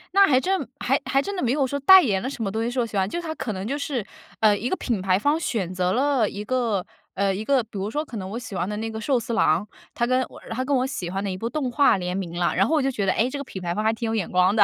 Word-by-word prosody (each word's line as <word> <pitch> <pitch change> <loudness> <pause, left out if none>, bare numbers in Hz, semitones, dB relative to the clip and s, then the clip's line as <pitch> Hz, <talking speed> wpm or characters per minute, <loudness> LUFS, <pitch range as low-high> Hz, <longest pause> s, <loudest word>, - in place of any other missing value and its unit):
那 395 - +8
还 260 -7 +4
真 380 +5 0
还 - - +1
还 275 - +2
真 400 +6 -4
的 360 - -2
没 235 - +2
有 275 -1 +1
说 280 - -2
代 380 +6 +9
言 200 - 0
了 260 - -2
什 270 - -7
么 200 - 0
东 220 +3 -2
西 235 - -1
是 255 - -2
我 240 - +2
喜 220 - -8
欢， 190 -1 +2
就 345 - -3
是 340 - -6
它 315 - -3
可 230 - -4
能 190 +1 -4
就 280 +3 -1
是， 275 -6 -2 0.4
呃， 210 -2 +4
一 235 +5 -2
个 - - +1
品 230 -7 -2
牌 185 0 +2
方 290 +7 +2
选 215 - -2
择 180 0 0
了 260 -1 +2
一 200 - -6
个， 230 -7 0 0.3
呃， 195 0 +1
一 210 - -4
个， 270 +1 +3
比 225 - -23
如 200 +3 -3
说 300 +4 -1
可 235 - -10
能 190 -3 -4
我 235 - -4
喜 215 -5 -8
欢 180 +1 -1
的 210 0 -3
那 225 +1 -3
个 220 0 -5
寿 260 +2 +1
司 230 0 -4
郎， 185 -1 +2 0.3
它 235 - 0
跟 255 +1 +2
我 - - -13
然 - - -11
后 225 - -3
它 255 +1 -2
跟 280 - +1
我 255 +1 +1
喜 180 -10 -4
欢 195 +2 -3
的 200 - -2
一 185 - -3
部 230 +4 -3
动 280 -3 -2
画 280 -3 +4
联 180 0 -3
名 185 -4 -3
了， 170 - +1
然 195 +2 +4
后 320 - 0
我 - - +2
就 270 - +1
觉 210 -6 -2
得 185 - +3
哎 235 +3 +1
这 285 - -5
个 280 - -4
品 190 -8 -8
牌 175 -1 -2
方 215 - -1
还 220 - +3
挺 225 +1 -3
有 225 - -1
眼 195 -6 -2
光 185 +3 +3
的， 210 - +7
225 Hz, 375 characters per minute, -24 LUFS, 195-265 Hz, 0.4 s, 代